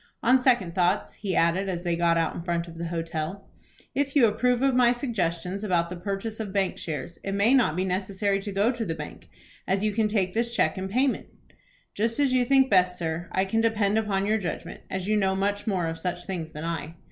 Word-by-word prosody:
On 255 Hz, +3 st, +5 dB
second 240 Hz, -10 st, +2 dB
thoughts," 180 Hz, -1 st, +1 dB
he 195 Hz, -4 st, -3 dB
added, 175 Hz, +4 st, +2 dB
as 175 Hz, -2 st, -3 dB
they 175 Hz, -1 st, 0 dB
got 170 Hz, 0 st, +2 dB
out 165 Hz, -1 st, +1 dB
in -, -, -6 dB
front 170 Hz, 0 st, -2 dB
of 165 Hz, -1 st, -10 dB
the 170 Hz, -, -3 dB
hotel, 165 Hz, +2 st, -4 dB, 0.5 s
"if 280 Hz, 0 st, -1 dB
you 270 Hz, -5 st, +7 dB
approve 245 Hz, +4 st, +1 dB
of 270 Hz, -1 st, +3 dB
my 245 Hz, -1 st, +5 dB
suggestions 195 Hz, -6 st, -2 dB
about 175 Hz, -4 st, +1 dB
the -, -, -4 dB
purchase 200 Hz, +5 st, -4 dB
of 215 Hz, -3 st, -4 dB
bank 195 Hz, -2 st, 0 dB
shares, 160 Hz, +1 st, -5 dB
it 195 Hz, -, -3 dB
may 200 Hz, +6 st, +3 dB
not 240 Hz, -12 st, +3 dB
be 185 Hz, +1 st, 0 dB
necessary 195 Hz, +2 st, 0 dB
to 200 Hz, +1 st, -5 dB
go 200 Hz, +5 st, +2 dB
to 235 Hz, -2 st, -3 dB
the 165 Hz, -6 st, -3 dB
bank, 150 Hz, -2 st, -9 dB, 0.4 s
as 190 Hz, +2 st, +1 dB
you 215 Hz, -, +2 dB
can 215 Hz, +1 st, +1 dB
take 195 Hz, -4 st, 0 dB
this 235 Hz, +1 st, 0 dB
cheque 190 Hz, -, +1 dB
in 190 Hz, -, -3 dB
payment." 255 Hz, +6 st, 0 dB, 0.7 s
"Just 230 Hz, +4 st, -1 dB
as 275 Hz, -3 st, +3 dB
you 255 Hz, -1 st, +4 dB
think 270 Hz, +1 st, +5 dB
best, 180 Hz, -5 st, +3 dB
sir. 165 Hz, 0 st, -3 dB
I 190 Hz, -, +1 dB
can 225 Hz, +4 st, +1 dB
depend 220 Hz, -2 st, +2 dB
upon 200 Hz, -3 st, 0 dB
your 215 Hz, +2 st, +2 dB
judgment, 175 Hz, -4 st, -5 dB
as 190 Hz, 0 st, -3 dB
you 215 Hz, 0 st, +2 dB
know 190 Hz, -2 st, +2 dB
much 205 Hz, +2 st, -1 dB
more 185 Hz, -5 st, 0 dB
of 165 Hz, 0 st, -3 dB
such 175 Hz, 0 st, -3 dB
things 170 Hz, -4 st, -4 dB
than 150 Hz, +1 st, -6 dB
I." 165 Hz, -1 st, -4 dB
195 Hz, 230 wpm, -26 LUFS, 175-220 Hz, 0.7 s, you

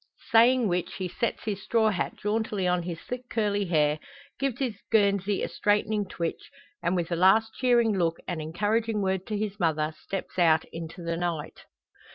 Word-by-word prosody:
Saying 235 Hz, +1 st, +5 dB
which, 180 Hz, -1 st, -1 dB
he 185 Hz, -, -3 dB
sets 235 Hz, +6 st, -2 dB
his 200 Hz, -3 st, -3 dB
straw 220 Hz, 0 st, +2 dB
hat 185 Hz, -, -2 dB
jauntily 210 Hz, -2 st, -1 dB
on 180 Hz, 0 st, +2 dB
his 170 Hz, -1 st, -5 dB
thick 250 Hz, 0 st, -7 dB
curly 205 Hz, -2 st, 0 dB
hair, 155 Hz, -3 st, +2 dB, 0.4 s
gives 270 Hz, -3 st, -1 dB
his 245 Hz, -7 st, -3 dB
guernsey 200 Hz, -2 st, +2 dB
a -, -, 0 dB
straightening 210 Hz, 0 st, +1 dB
twitch, 170 Hz, -2 st, -4 dB, 0.3 s
and, 175 Hz, -, +1 dB
with 175 Hz, -1 st, -2 dB
a -, -, +2 dB
last 215 Hz, +6 st, +4 dB
cheering 240 Hz, -4 st, +3 dB
look 170 Hz, -3 st, +1 dB
and 170 Hz, -3 st, -3 dB
encouraging 210 Hz, +7 st, 0 dB
word 190 Hz, -1 st, -1 dB
to 215 Hz, -, -2 dB
his 205 Hz, -1 st, -3 dB
mother, 155 Hz, -2 st, +1 dB
steps 195 Hz, -1 st, -5 dB
out 160 Hz, -2 st, +4 dB
into 165 Hz, +2 st, -7 dB
the 170 Hz, 0 st, -2 dB
night. 170 Hz, -3 st, -4 dB
195 Hz, 180 wpm, -27 LUFS, 170-220 Hz, 0.4 s, Saying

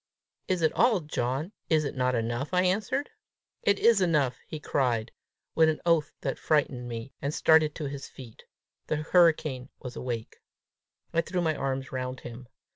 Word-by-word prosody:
"It 180 Hz, -3 st, 0 dB
is 160 Hz, -, +4 dB
all, 220 Hz, -7 st, +3 dB
John: 150 Hz, +2 st, -2 dB, 0.2 s
is 155 Hz, -1 st, +3 dB
it 140 Hz, -, -3 dB
not 125 Hz, -1 st, +1 dB
enough?" 120 Hz, +7 st, -2 dB
I 180 Hz, -, +4 dB
answered. 200 Hz, +9 st, 0 dB, 0.5 s
"It 200 Hz, 0 st, +3 dB
is 230 Hz, -2 st, +4 dB
enough," 150 Hz, -8 st, +2 dB
he 155 Hz, -, -6 dB
cried, 125 Hz, -6 st, 0 dB, 0.4 s
with 160 Hz, -1 st, +5 dB
an 155 Hz, -, -1 dB
oath 165 Hz, -4 st, +3 dB
that -, -, -3 dB
frightened 140 Hz, -5 st, +1 dB
me, 115 Hz, +3 st, -6 dB
and 140 Hz, -, -1 dB
started 155 Hz, 0 st, +4 dB
to 155 Hz, -, -4 dB
his 140 Hz, 0 st, -6 dB
feet. 120 Hz, -4 st, -13 dB, 0.4 s
The -, -, 0 dB
hurricane 155 Hz, -5 st, +2 dB
was 125 Hz, -2 st, -8 dB
awake. 120 Hz, -3 st, -5 dB, 0.8 s
I 165 Hz, -, +3 dB
threw 180 Hz, +2 st, -3 dB
my 160 Hz, -2 st, +1 dB
arms 135 Hz, -1 st, -3 dB
round 130 Hz, 0 st, -4 dB
him. 120 Hz, +1 st, -9 dB
145 Hz, 170 wpm, -28 LUFS, 125-165 Hz, 0.8 s, with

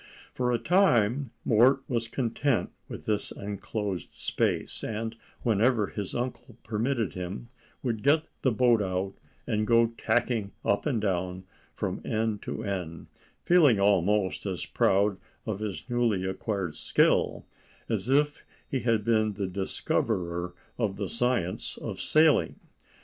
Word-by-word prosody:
For 125 Hz, -1 st, 0 dB
a 120 Hz, -, +2 dB
time 135 Hz, -, +3 dB, 0.2 s
Mort 130 Hz, +5 st, +5 dB
was 115 Hz, -3 st, -1 dB
content 125 Hz, +2 st, 0 dB, 0.2 s
with -, -, -8 dB
this 105 Hz, -1 st, -1 dB
enclosed 100 Hz, -2 st, -4 dB
space, -, -, -1 dB
and, 115 Hz, +1 st, -3 dB, 0.3 s
whenever 115 Hz, 0 st, +3 dB
his 100 Hz, -1 st, -5 dB
uncle 125 Hz, -1 st, -4 dB
permitted 115 Hz, 0 st, -1 dB
him, 90 Hz, +6 st, -6 dB, 0.3 s
would 115 Hz, -5 st, -1 dB
get 150 Hz, +5 st, +4 dB, 0.2 s
the 130 Hz, -, +3 dB
boat 120 Hz, -1 st, +4 dB
out, 95 Hz, 0 st, -2 dB, 0.3 s
and 110 Hz, -3 st, 0 dB
go 115 Hz, 0 st, +4 dB
tacking 115 Hz, -4 st, 0 dB
up 100 Hz, +9 st, +1 dB
and 130 Hz, -6 st, +1 dB
down 95 Hz, -2 st, -1 dB, 0.3 s
from -, -, -3 dB
end 110 Hz, -1 st, -1 dB
to -, -, -5 dB
end, 90 Hz, -5 st, -4 dB, 0.3 s
feeling 150 Hz, -, +5 dB
almost 100 Hz, 0 st, +2 dB
as 90 Hz, -5 st, -3 dB
proud 100 Hz, 0 st, +2 dB, 0.3 s
of 105 Hz, -3 st, -3 dB
his 105 Hz, -1 st, -5 dB
newly 120 Hz, -6 st, +1 dB
acquired 95 Hz, -2 st, -2 dB
skill -, -, +2 dB, 0.4 s
as 110 Hz, 0 st, -2 dB
if 145 Hz, +2 st, +2 dB, 0.2 s
he 135 Hz, -, -1 dB
had 115 Hz, -4 st, +1 dB
been 110 Hz, -2 st, +2 dB
discoverer 90 Hz, -2 st, -2 dB, 0.2 s
of 105 Hz, -5 st, 0 dB
the 100 Hz, -2 st, -3 dB
science 120 Hz, -7 st, -1 dB
of -, -, -6 dB
sailing. 155 Hz, -4 st, +4 dB
110 Hz, 135 wpm, -28 LUFS, 100-120 Hz, 0.4 s, Mort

